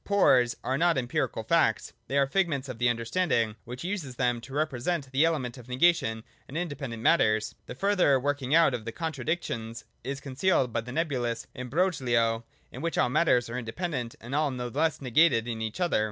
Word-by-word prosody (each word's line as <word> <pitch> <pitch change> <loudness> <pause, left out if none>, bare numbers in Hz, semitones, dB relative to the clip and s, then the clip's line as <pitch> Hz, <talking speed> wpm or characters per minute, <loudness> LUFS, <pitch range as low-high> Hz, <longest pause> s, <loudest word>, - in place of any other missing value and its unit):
Pores 130 -12 +4
are 130 +2 -1
not 170 -2 +3
empirical 120 -2 -1
facts; - - +1
they 140 - -1
are 140 - +5
figments 145 -3 0
of 125 -3 -7
the 120 0 +3
understanding, 115 -2 0
which 125 +4 -7
uses 175 -9 -4
them 120 -1 0
to 135 - -12
re 155 +1 +3
present 140 +1 -3
the 135 +3 +3
element 135 -7 0
of 120 - -13
negation 125 -5 +2 0.3
in 140 - -5
independent 140 -9 -4
matters. 110 -8 +3
The - - -7
further 185 -6 +3
working 140 +1 0
out 165 -5 +5
of 120 -3 -3
the 115 - -4
contradictions 135 -6 -3 0.2
is 140 +1 -4
con 140 -2 -8
cealed 135 -4 +2
by 115 - 0
the 125 +2 -9
nebulous 125 -6 -1
imbrogho 125 -6 +1 0.3
in - - -8
which 170 0 -2
all - - +3
matters 125 -3 +3
are 115 +2 -4
independent 125 0 -4
and 120 +4 -8
all 150 0 +2
no 125 -2 -4
less 155 +6 0
negated 125 -3 +3
in 115 -2 -4
each 110 +5 -4
other. 175 -8 +2
130 Hz, 195 wpm, -28 LUFS, 120-160 Hz, 0.3 s, are